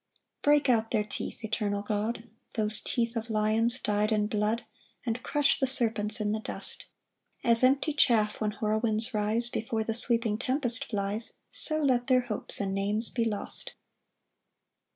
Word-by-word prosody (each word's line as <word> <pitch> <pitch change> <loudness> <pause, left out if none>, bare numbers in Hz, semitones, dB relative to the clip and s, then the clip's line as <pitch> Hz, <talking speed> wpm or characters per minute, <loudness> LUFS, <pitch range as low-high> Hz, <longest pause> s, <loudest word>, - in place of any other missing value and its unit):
4 290 - +4
Break 295 -1 +2
out 225 -3 +2
their 210 - +1
teeth, 210 - -7
eternal 205 -2 -2
God, 220 +3 -3 0.3
Those 215 -1 +1
teeth 235 0 -2
of 230 0 -4
lions 220 +3 +1
dy'd 210 -1 0
in 210 -1 +2
blood; 215 +2 -1 0.4
And 235 +1 -2
crush 290 +1 +1
the 265 - +1
serpents 220 -5 +2
in 210 -1 -1
the 215 - -1
dust: - - -4 0.6
As 230 +1 +5
empty 275 +4 +3
chaff 225 -8 +2
when 210 -1 -1
whirlwinds 220 +2 -1
rise, 215 +3 0
Before 225 -1 -3
the 225 - -2
sweeping 230 -2 +3
tempest 255 -1 0
flies, 205 +1 -3 0.2
So 310 -1 +5
let 250 -3 +1
their 255 -1 +4
hopes 235 -4 -2
and 195 -1 -2
names 205 +3 0
be 230 -2 -1
lost. 225 - -2
225 Hz, 160 wpm, -28 LUFS, 210-245 Hz, 0.6 s, As